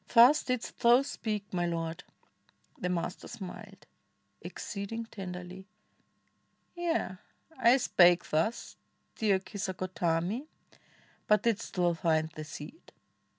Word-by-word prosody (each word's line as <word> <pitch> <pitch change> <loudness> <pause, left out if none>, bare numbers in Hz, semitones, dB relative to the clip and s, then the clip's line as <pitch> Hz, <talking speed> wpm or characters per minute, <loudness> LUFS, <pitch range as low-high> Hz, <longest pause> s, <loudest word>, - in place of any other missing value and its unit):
Thus 250 +6 +8
didst 255 -2 -3
thou 240 +3 +6
speak, 215 -8 -4
my 175 -1 0
Lord!" 165 0 -3 0.8
The 180 - -1
Master 180 0 -3
smiled 190 -4 -9 0.6
Exceeding 220 +3 -5
tenderly. 185 -2 -8 1.1
"Yea! 330 - -1 0.4
I 240 +3 +6
spake 175 -8 +5
thus, 165 +10 -1 0.4
Dear 205 -3 +3
Kisagotami! 185 - -2 0.8
But 210 -1 +4
didst 230 -2 -1
thou 175 -2 +3
find 160 -2 +1
' - - -25
The 155 - -5
seed?" 150 - -10
190 Hz, 110 wpm, -30 LUFS, 175-230 Hz, 1.1 s, Thus